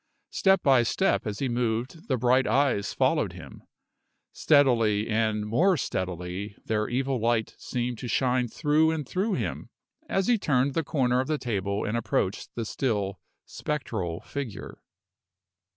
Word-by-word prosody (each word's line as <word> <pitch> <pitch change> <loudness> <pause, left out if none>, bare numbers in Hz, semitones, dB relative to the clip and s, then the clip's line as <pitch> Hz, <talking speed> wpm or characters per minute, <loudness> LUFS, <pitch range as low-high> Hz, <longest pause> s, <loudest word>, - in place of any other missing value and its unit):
Step 190 0 +3
by 135 -3 +5
step 120 - +1
as 105 -1 -3
he 135 - -1
moved 120 +5 -2
the 130 - +1
bright 125 +2 +3
eyes 135 -7 +1
followed - - +1
him. - - -11 0.7
Steadily 115 -8 +3
and 110 -1 0
more 170 - +3
steadily 95 - -4
their 110 -1 -1
evil 130 +1 -1
light 115 0 0
seemed 120 -2 -3
to 125 - -5
shine 125 +1 +1
through 150 +6 +2
and 155 -4 -2
through 195 - -1
him, - - -3 0.4
as 195 -1 +1
he 240 -3 +3
turned 135 -4 +1
the 165 - 0
corner 125 -4 +1
of 130 - -1
the 155 - 0
table 100 -5 -2
and 105 - -2
approached 110 -4 -1
the 115 - -3
still, 105 - -2 0.3
spectral 105 - -4
figure. 130 -8 -7
125 Hz, 150 wpm, -27 LUFS, 105-140 Hz, 0.7 s, by